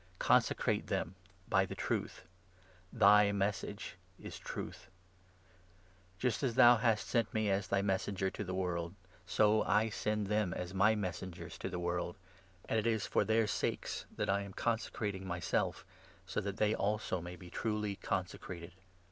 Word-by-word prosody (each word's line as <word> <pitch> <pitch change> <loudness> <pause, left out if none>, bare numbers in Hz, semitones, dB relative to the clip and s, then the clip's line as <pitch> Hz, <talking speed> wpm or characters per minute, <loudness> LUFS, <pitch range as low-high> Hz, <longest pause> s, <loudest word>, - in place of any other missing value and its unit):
Consecrate - - +2
them 85 - -1 0.3
by 95 -2 +4
the 95 - -5
Truth; - - -2 0.7
thy 105 -2 +7
17 100 0 0
Message 100 -1 -2 0.2
is - - -8
Truth. 90 +2 -7 1.3
Just 125 +2 0
as 125 -5 0
thou 120 -1 +8
hast 110 -1 +1
sent 115 -3 +1
me 110 -1 +2
18 - - +3
as 95 -1 -1
thy 100 - +2
Messenger 95 -1 0
to - - -4
the 95 -1 -4
world, 85 -1 -2 0.3
so 105 +3 +4
I 105 +3 +2
send 105 0 -1
them 105 -3 0
as 90 +1 -4
my 100 +3 +4
Messengers 95 -3 -5
to - - -3
the 90 - -4
world. 85 0 -2 0.5
And 110 - +2
it 110 - -1
is 110 -3 +1
19 - - -6
for - - +3
their 110 0 +3
sakes 105 - -2
that - - -1
I 100 +1 +2
am 100 -1 -7
consecrating 105 -4 -2
myself, 90 -1 -1 0.4
so - - -2
that 100 0 -4
they 105 0 +3
also 105 -3 -1
may 90 +1 -7
be 90 -1 -12
truly 105 -2 -2
consecrated. 90 -2 -4
100 Hz, 165 wpm, -34 LUFS, 95-110 Hz, 1.3 s, thou